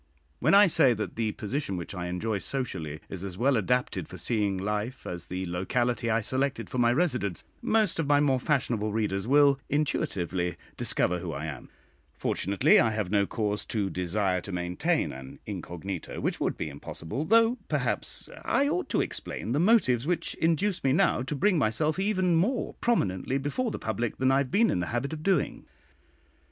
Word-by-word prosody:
When - - +4
I 205 +1 +9
say 135 -8 +4
that 105 - -4
the 110 -2 -1
position 105 -2 -3
which 85 - -6
I 90 -2 -4
enjoy 100 +4 -2
socially, 80 - -4
is 95 -1 -7
as 95 -2 -6
well 130 +5 +3
adapted 125 +3 0
for - - -9
seeing 105 -5 0
life 105 +6 -3
as 90 0 -5
the 90 +1 -3
locality 115 +7 -1
I 115 +1 +2
selected 130 +4 -2
for 130 - -2
my 120 -1 +4
residence, 125 - 0 0.2
most 215 -6 +2
of 155 - 0
my 145 0 +5
more 135 -3 +3
fashionable 120 -7 0
readers 105 -2 -1
will 140 0 +5
intuitively 95 - -1 0.2
discover 90 0 +1
who 85 -2 -5
I 70 +2 -4
am; 70 -5 -7 0.5
fortunately, 100 0 +3
I 115 - +4
have 105 -4 -2
no 100 -1 +3
cause 105 -2 -1
to 100 -4 -1
desire 90 +1 0
to 100 - -8
maintain 90 0 0
an 65 0 -9
incognito 90 +1 -6
which - - -1
would - - -1
be - - -3
impossible, 80 - -5
though, 230 +6 +4
perhaps, - - -1 0.2
I 280 - +2
ought 355 +5 -1
to - - +2
explain - - -4
the 140 - +1
motives 155 - +3
which 175 -1 0
induce 170 +4 0
me 135 -1 +3
now 135 - +3
to 135 +4 -3
bring 180 +4 +2
myself 150 - +1
even 185 -3 +1
more 235 +10 0
prominently 130 - +1
before 145 - -1
the - - -4
public 110 +1 -2
than 130 0 +3
I 135 - +4
have 140 -2 -1
been 225 - +3
in - - 0
the 85 - -2
habit 125 +5 -2
of 155 - -5
doing. 195 +3 0
120 Hz, 185 wpm, -28 LUFS, 95-145 Hz, 0.5 s, I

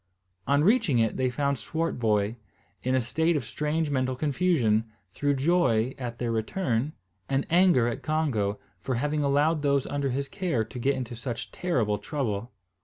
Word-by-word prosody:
On 145 +1 +3
reaching 210 - +3
it 115 -1 +2
they 130 -1 +1
found 140 0 -1
Swartboy 115 -8 0 0.5
in 130 +1 0
a 130 - +3
state 160 +8 +1
of 140 -6 -1
strange 150 +5 -1
mental 130 -1 0
confusion, 140 -7 +2 0.3
through 145 +5 +1
joy 135 -6 +2
at 120 -2 -5
their 120 -1 -2
return, 120 - -1 0.4
and 135 0 +1
anger 175 -9 +5
at 120 - -3
Congo, 130 -11 0 0.2
for 130 - -2
having 150 +4 0
allowed 145 +3 +2
those 140 -2 +2
under 140 -1 -1
his 140 +2 -2
care 175 - -1
to 125 +3 -8
get 135 +3 +1
into 125 -2 -5
such 120 0 -5
terrible 115 - 0
trouble. 120 -7 -3
135 Hz, 165 wpm, -27 LUFS, 120-150 Hz, 0.5 s, anger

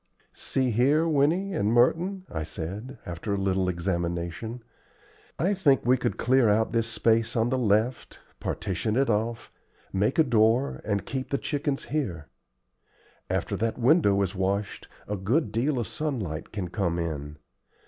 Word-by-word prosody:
"See 130 -2 0
here, 140 +8 +3
Winnie 165 +6 +2
and 105 - +1
Merton," 175 +11 +2
I 80 - -3
said, 100 - -6
after 90 +4 -3
a - - -2
little 95 -1 +1
examination, 85 +5 -3 0.7
"I 185 +5 +1
think 145 - +3
we 125 +1 +5
could 120 -2 -2
clear 130 -2 +3
out 110 +2 +2
this 115 -1 +1
space 115 0 +1
on 115 0 +2
the 130 - +1
left, 110 +2 0 0.2
partition 100 +4 -2
it 135 -1 +2
off, 115 +2 -2 0.4
make 100 +6 +1
a 160 - +7
door, 120 +1 +2
and 100 -2 -1
keep 130 -1 -4
the 140 - 0
chickens 145 0 -2
here. 90 - -2 1.0
After - - -1
that 115 +1 -1
window 120 - +4
is 95 0 -2
washed, 100 +1 -2 0.2
a 105 - -2
good 105 - 0
deal 130 +6 0
of 120 - -1
sunlight 115 - -3
can 100 -5 -4
come 85 -5 -1
in. 75 -3 -4
115 Hz, 155 wpm, -27 LUFS, 95-135 Hz, 1.0 s, a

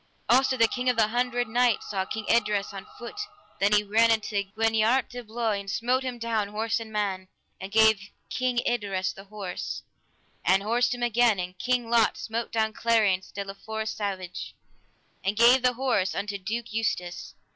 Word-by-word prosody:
Also 260 +1 +4
the 230 -1 +5
King 250 +2 -1
of 250 - +2
the 215 -2 +4
Hundred 245 0 0
Knights 240 0 +1
saw 190 -2 -1
King 215 +2 -5
Idres 210 -4 +1
on 195 -1 -8
foot; 240 +13 -7 0.4
then 200 +1 +3
he 210 0 +4
ran 220 +3 +3
unto 215 -2 +1 0.2
Gwiniart 225 +3 +2
de 245 0 -7
Bloi, 220 -2 -1
and 200 0 -8
smote 240 +6 +1
him 255 -2 -4
down, 230 -3 -1
horse 215 +2 -1
and 225 -1 -8
man, 195 -3 -2 0.3
and 190 +1 -7
gave 220 -2 +4 0.2
King 255 -1 -1
Idres 200 -6 -1
the 195 - -12
horse, 200 -3 -5 0.6
and 190 +1 +3
horsed 240 +3 +1
him 245 - -5
again; 240 -2 +3
and 180 0 -4
King 250 -2 0
Lot 230 -1 +3
smote 230 +1 -4
down 220 -1 0
Clariance 210 -6 +2
de 200 0 -5
la 195 - -6
Forest 220 +2 -5
Savage, 190 -4 -4 0.7
and 195 +2 -1
gave 245 +3 +6
the 250 0 +3
horse 245 -7 0
unto 200 0 -3
Duke 225 +4 -4
Eustace. 180 -6 -2
220 Hz, 180 wpm, -27 LUFS, 200-240 Hz, 0.7 s, gave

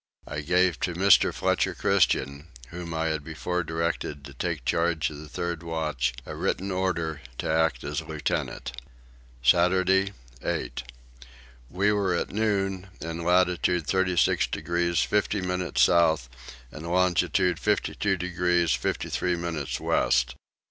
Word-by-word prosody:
I 75 +1 -4
gave 90 +1 +2
to 90 - -2
Mr. 95 +2 +5
Fletcher - - 0
Christian, 70 +4 +1 0.2
whom 85 -1 -7
I 80 0 0
had 80 -2 -2
before 85 +3 -3
directed 80 -3 -3
to 70 - -10
take 65 - -3
charge 85 -2 +1
of 75 - -9
the 75 0 -10
third 85 +1 -3
watch, 75 -7 -2
a - - -6
written 95 +2 -1
order 85 -5 -1 0.2
to - - -3
act 80 +1 +1
as 75 +1 -2
lieutenant. 80 -4 -3 0.7
Saturday 95 +7 +3 0.3
8. - - -3 0.9
We 100 +7 +2
were 100 -4 +1
at - - -2
noon 95 -3 0
in 85 +1 -5
latitude 90 -1 +2
36 95 -1 +2
degrees 85 +2 0
50 105 0 0
minutes 90 0 +1
south 80 -7 +3 0.4
and 80 +2 -8
longitude 90 -1 +2
52 105 -1 0
degrees 90 -1 +1
53 90 -1 -1
minutes 85 -5 -3
west. 60 0 +2
85 Hz, 130 wpm, -26 LUFS, 80-90 Hz, 0.9 s, Mr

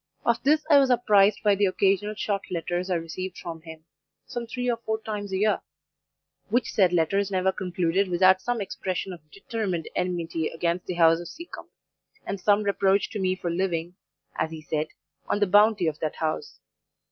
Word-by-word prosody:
Of 235 0 +2
this 300 +2 +2
I 295 -3 +7
was 270 -1 +3
apprised 210 -4 +4
by 205 -1 +5
the 200 0 +2
occasional 195 +2 +1
short 205 -2 -1
letters 175 +1 -2
I 180 - +1
received 175 +3 -5
from 165 -2 -7
him, 160 -1 -12 0.4
some 235 -1 -5
three 250 +2 -3
or 240 -1 +1
four 220 -1 -3
times 210 -2 -5
a 190 - 0
year; 210 +2 +2 0.9
which 245 +1 +1
said 185 -4 +3
letters 190 +4 +1
never 190 -1 +1
concluded 180 +1 0
without 185 +1 +4
some 245 -2 -2
expression 190 -1 -4
of 155 -3 -14
determined 195 -3 -4
enmity 170 -3 -1
against 170 +2 -2
the 180 - -3
house 165 -1 +5
of 175 - -7
Seacombe, 340 - -10 0.6
and 200 - -4
some 205 +2 +3
reproach 200 -1 +2
to 210 - -4
me 185 -1 +1
for 175 -2 -3
living, 170 -1 -1 0.4
as - - -1
he 160 -1 -9
said, 155 +1 -2 0.4
on - - 0
the 205 - +4
bounty 205 0 +4
of 155 -1 -1
that 155 - -2
house. 160 - -3
190 Hz, 185 wpm, -26 LUFS, 170-210 Hz, 0.9 s, I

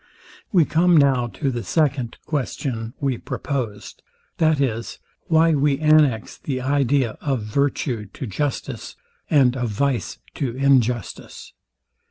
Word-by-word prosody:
We 175 -6 +4
come 170 +2 +3
now 135 -4 +3
to 135 +3 -2
the 120 -1 -3
second 135 -5 0
question 130 -5 -3
we 135 -4 -1
proposed, 120 -8 -5 0.4
viz. 140 -8 0 0.3
Why 165 0 +4
we 140 -1 +2
annex 150 -7 +3
the 130 -3 -3
idea 135 -2 +1
of 135 -6 -1
virtue 120 -1 -1
to 100 - -7
justice, 135 +6 -4 0.3
and 135 -5 +4
of 120 -3 -2
vice 130 +4 -1 0.2
to 125 -5 -3
injustice. 125 -6 0
135 Hz, 120 wpm, -22 LUFS, 120-145 Hz, 0.4 s, We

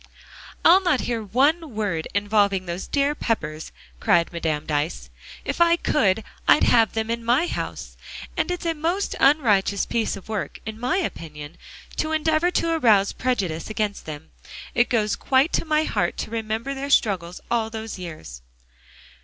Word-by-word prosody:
"I'll 370 +3 +8
not 355 -8 +2
hear 235 -2 -2
one 275 - +1
word 195 -7 -2
involving 205 -2 +2
those 175 +1 -5
dear 280 0 +1
Peppers," 160 - -3 0.3
cried 170 0 +2
Madame 155 -3 -2
Dyce. 145 - -2 0.3
"If - - -2
I 340 0 +6
could, 220 - +1 0.2
I'd - - +6
have 225 -3 +4
them 220 0 -2
in 235 0 -3
my 245 +8 +3
house. - - -5 0.4
And - - 0
it's 355 -1 -3
a 330 - +1
most 335 +6 -1
unrighteous 210 -9 +3
piece 230 -2 -1
of 195 - -11
work, 215 -3 -4
in 220 0 -6
my 250 +10 0
opinion, 155 - -5 0.4
to 315 0 -1
endeavor 315 +2 +2
to 335 -2 0
arouse 215 -10 +4
prejudice 195 -11 -2
against 215 -4 -3
them. 155 0 -8 0.4
It 240 - +2
goes 215 -3 +1
quite 270 +4 +2
to - - 0
my 310 -1 +2
heart 175 - -1
to - - -5
remember 225 +3 -3
their 275 +1 -5
struggles 180 -9 +1
all 230 -2 +1
those 220 -2 -6
years." 80 - -8
220 Hz, 160 wpm, -23 LUFS, 185-285 Hz, 0.4 s, I'll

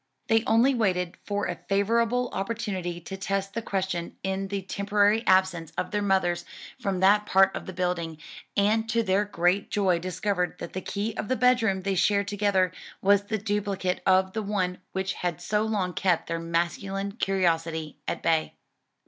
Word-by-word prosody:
They 225 0 +4
only 230 +5 +4
waited 185 -7 0
for 205 0 -1
a 175 - -4
favorable 230 +5 +2
opportunity 195 -4 -3
to 190 +4 -7
test 195 0 -2
the 230 - -2
question 190 -5 -3
in 190 0 -2
the 195 0 -3
temporary 205 +3 +2
absence 185 -4 +3
of - - -2
their 210 -1 0
mothers 190 -3 +1 0.4
from 195 -6 -2
that 210 +2 +4
part 195 0 +4
of - - -6
the - - -4
building, 175 -3 -2 0.4
and 220 +3 +2
to 230 +1 +2
their 200 0 +2
great 185 0 +1
joy 190 -4 +2
discovered 180 +1 -2
that - - -7
the 185 - -3
key 210 +4 -3
of - - -3
the 260 - +1
bedroom 230 -7 +2
they 195 0 0
shared 200 +2 +2
together 200 -3 +2 0.3
was 200 +1 +3
the 220 +1 -1
duplicate 200 -3 -1
of 190 0 +4
the 220 - -1
one 190 -3 -1
which 190 0 -2
had 175 -4 -3
so 210 0 0
long 205 -5 -1
kept 180 -2 +1
their 165 0 -3
masculine 175 +4 -2
curiosity 165 -6 -1
at - - -3
bay. 160 -1 +1
195 Hz, 175 wpm, -27 LUFS, 180-210 Hz, 0.4 s, They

